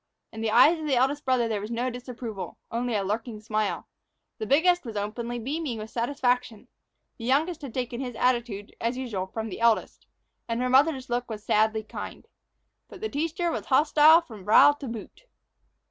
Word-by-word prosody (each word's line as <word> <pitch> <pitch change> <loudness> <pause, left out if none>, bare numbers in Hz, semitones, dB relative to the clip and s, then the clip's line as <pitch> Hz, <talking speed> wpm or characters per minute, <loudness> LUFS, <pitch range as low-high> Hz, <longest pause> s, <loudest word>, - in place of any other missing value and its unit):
In 220 - -7
the 225 - 0
eyes 295 +9 +6
of 310 - -4
the 275 - +2
eldest 270 +4 +1
brother 255 -3 +2
there 215 -3 -2
was 210 - -6
no 240 +2 -1
disapproval, 240 -4 -7
only 235 0 -1
a 200 - 0
lurking 215 +3 -3
smile; 215 -1 -2 0.5
the 220 - -3
biggest 350 - +3
was 230 -4 -7
openly 230 +4 -3
beaming 270 +1 -3
with 215 +1 -7
satisfaction; 245 -2 -1 0.5
the 230 - -6
youngest 315 +6 +1
had 275 -4 -7
taken 245 -1 -3
his 250 -3 -5
attitude, 235 -5 -1
as 235 +2 -1
usual, 215 -8 -3
from 220 +3 -5
the 190 - -7
eldest; 230 -1 +1 0.4
and 230 0 -2
her 250 0 0
mother's 270 0 +3
look 245 0 -1
was 215 -2 -6
sadly 220 +1 +2
kind. 215 - -8 0.6
But - - -12
the 435 - -2
teacher 330 +4 -1
was 215 -8 -4
hostile 305 +4 +6
from 220 - -12
brow 215 +8 +7
to 290 -2 -8
boot. 230 - -8
240 Hz, 185 wpm, -26 LUFS, 220-275 Hz, 0.6 s, brow